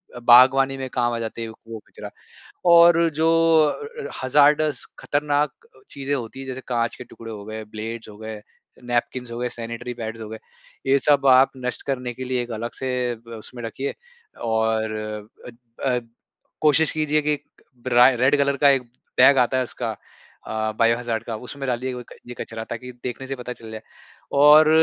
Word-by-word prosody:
अ, - - -6
बागवानी 130 +3 +6
में 130 -1 -5
काम 120 -1 +1
आ 115 - -2
जाते 115 0 -5
है 115 - -4
व - - -10
वो 115 -1 -7
कचरा। - - -9 0.6
और 170 0 +7
जो 160 +2 +2 0.3
अ 155 - -1 0.2
अ, - - -5
हज़ार्डस, 145 +1 +3
खतरनाक 145 0 0 0.2
अ, - - -19
चीज़ें 140 0 -4
होती 125 0 -6
हैं, 135 - -7
जैसे 130 0 -5
काँच 120 -2 -1
के - - -9
टुकड़े 115 -2 -11
हो 105 -2 -8
गए, 110 +1 -6
ब्लेड्स 110 +2 -7
हो 105 - -12
गए, 110 -1 -7 0.4
नैपकिंस 120 0 -2
हो 115 - -5
गए, 125 0 -1
सैनिटरी 115 +1 -5
पैड्स 115 -1 -6
हो 110 - -6
गए। 110 - -7 0.5
ये 135 - +5
सब 140 0 +3
आप 130 +1 +6
नष्ट 125 - -2
करने 125 -2 -2
के 130 - -7
लिए 130 -1 -1
एक 120 - -9
अलग 115 +1 -4
से 130 - -5 0.3
ब 115 +1 -13
उसमें 120 +2 -10
रखिए। 130 +5 -4 0.5
और 110 -1 0 0.5
अ - - -6 0.4
अ, 125 -2 +2 0.6
कोशिश 155 +1 +4
कीजिए 155 -1 +1
कि 150 0 +1
एक 145 - -5 0.4
राय 125 +1 +6
रेड 135 +4 +3
कलर 140 0 +1
का 140 +1 +5
एक 135 -2 +3 0.4
बैग 130 +2 +7
आता 125 +1 +3
है 130 - +2
उसका 120 -1 -4 0.6
अ, 110 0 -2
बायो 115 0 +4
हज़ार्ड 115 -2 -3
का, 115 -1 -5
उसमें 135 +4 -7
डालिये 125 +1 -2
वो 125 - -6
एक 120 - -14
ये 125 - -7
कचरा 115 0 -5
ताकि 125 +2 -6
देखने 125 +1 -5
से 135 - -3
पता 125 -1 -6
चल 115 -2 -12
जाए। 110 0 -7 0.6
और 150 +1 +8
125 Hz, 200 wpm, -23 LUFS, 115-135 Hz, 0.6 s, और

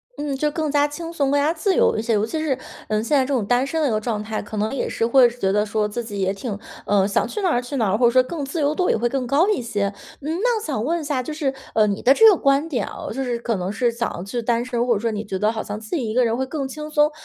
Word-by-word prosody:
嗯， 290 -2 -3
就 300 +3 0
更 310 -1 -2
加 290 0 +3
轻 330 +3 -7
松， 280 -4 +1
更 285 0 +3
加 305 +3 +2
自 375 +3 0
由 - - +3
一 220 - 0
些， 230 0 0
尤 210 - +1
其 315 +7 -3
是， 270 -4 0 0.3
呃， 215 0 0
现 290 +6 +1
在 265 - +4
这 275 - -4
种 240 -7 +1
单 245 +4 +2
身 320 +3 -2
的 - - +3
一 - - 0
个 215 0 0
状 215 -2 -2
态， 215 0 -3
可 215 +1 -7
能 215 +4 -1
也 275 - -2
是 230 - 0
会 245 0 +6
觉 215 -5 -1
得 210 +1 +2
说 210 0 0
自 235 +3 -4
己 205 -3 -6
也 190 0 +1
挺， 205 0 -5 0.3
呃， 200 -1 +3
想 200 - +1
去 425 - -5
哪 360 - +3
儿 245 - +1
去 250 +3 -6
哪 220 -7 +1
儿， 210 - +2
或 240 0 +4
者 - - +5
说 255 +1 +4
更 295 +2 -5
自 295 +5 -4
由 290 0 +2
度 360 +3 0
也 - - +3
会 240 +2 +1
更 260 -2 -2
高 295 +8 +3
一 420 -9 +1
些。 205 -4 -2 0.3
嗯， 320 +5 -3
那 485 -1 +2
我 - - -9
想 265 -8 -2
问 335 +4 0
一 - - -6
下， 285 -3 -1
就 280 - -6
是， 280 -4 -1 0.2
呃， 215 - +5
你 205 -1 -1
的 265 +3 +5
这 450 - +6
个 415 - +8
观 280 0 +2
点 245 -10 -2
哦， - - -7
就 270 - -2
是 245 -2 -1
可 235 -3 -2
能 185 +2 -3
是 235 +2 +1
想 235 0 -2
要 175 - -6
去 220 +5 -3
单 235 +1 0
身， 245 -1 -1
或 235 - +3
者 - - -1
说 230 +1 -1
你 210 0 -3
觉 195 -3 -4
得 210 +3 +2
好 220 - -3
像 205 0 -5
自 220 +9 -5
己 240 -8 -2
一 220 - -3
个 250 -1 +4
人 225 - +1
会 265 +2 -2
更 280 -1 -3
轻 300 +3 -7
松， 300 0 +3
245 Hz, 360 characters per minute, -22 LUFS, 215-290 Hz, 0.3 s, 个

